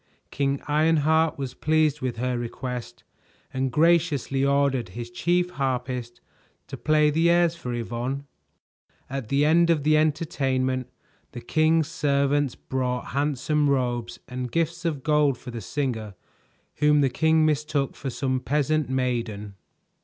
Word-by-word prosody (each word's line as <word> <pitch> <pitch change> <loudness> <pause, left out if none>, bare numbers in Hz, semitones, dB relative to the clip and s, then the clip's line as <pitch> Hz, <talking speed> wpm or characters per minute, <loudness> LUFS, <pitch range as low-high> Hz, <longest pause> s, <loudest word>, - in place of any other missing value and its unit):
King 140 0 -1
Ironheart 160 +1 +2
was 135 -3 -4
pleased 155 -1 +1
with 125 -3 -3
her 125 +1 -1
request 120 +1 -5 0.5
and 130 0 -1
graciously 155 -4 +2
ordered 140 -5 +1
his 120 +4 -7
chief 175 +7 0
harpist 125 -4 -3 0.4
to - - -7
play 150 -1 +3
the 165 +3 +3
airs 170 -1 +3
for 125 -7 -6
Yvonne. 120 +4 -3 0.9
At 135 -5 -4
the 140 +2 +2
end 170 +2 +4
of 160 -4 +2
the 155 +1 +4
entertainment, 135 -5 0 0.4
the - - -6
king's 155 +4 +2
servants 140 -3 +1
brought 125 -1 -3
handsome 145 +1 +1
robes 120 -3 -1
and 125 -1 -5
gifts 170 +3 -1
of 150 -6 -2
gold 150 -4 +2
for 125 - -9
the 115 -1 -6
singer 110 -2 -3 0.6
whom 150 0 +4
the 135 - +3
king 160 +1 +3
mistook 150 -2 0
for 135 - -5
some 130 +1 -1
peasant 150 +1 0
maiden. 120 -6 -2
140 Hz, 140 wpm, -25 LUFS, 125-155 Hz, 0.9 s, end